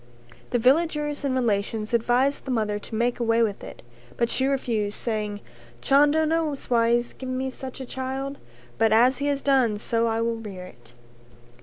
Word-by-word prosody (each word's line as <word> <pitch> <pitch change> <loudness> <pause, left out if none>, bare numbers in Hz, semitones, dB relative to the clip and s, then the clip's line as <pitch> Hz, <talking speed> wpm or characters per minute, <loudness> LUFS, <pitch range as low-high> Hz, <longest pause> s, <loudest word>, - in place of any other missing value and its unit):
The 245 - +1
villagers 295 +3 +1
and 270 -2 0
relations 215 -2 -1
advised 245 +4 +2
the - - -7
mother 215 -4 0
to 220 - -8
make 240 +2 0
away 230 0 +2
with 205 -3 -2
it, - - -10 0.3
but 235 0 +1
she 265 - +1
refused 230 -7 -1
saying 210 -3 -3 0.4
"Chando 295 - +4
knows 310 -4 -1
why 230 -1 +4
he 235 - +5
has 240 0 -2
given 255 -1 -5
me 265 0 -2
such 260 0 -8
a 260 - -5
child, 265 +2 -4 0.4
but 225 -1 +4
as 245 +4 +4
he 285 - -1
has 285 -1 -1
done 255 -6 +3
so 230 +2 0
I 225 0 0
will 230 0 0
rear 195 -5 -8
it." 120 -8 -17
240 Hz, 185 wpm, -25 LUFS, 225-270 Hz, 0.4 s, he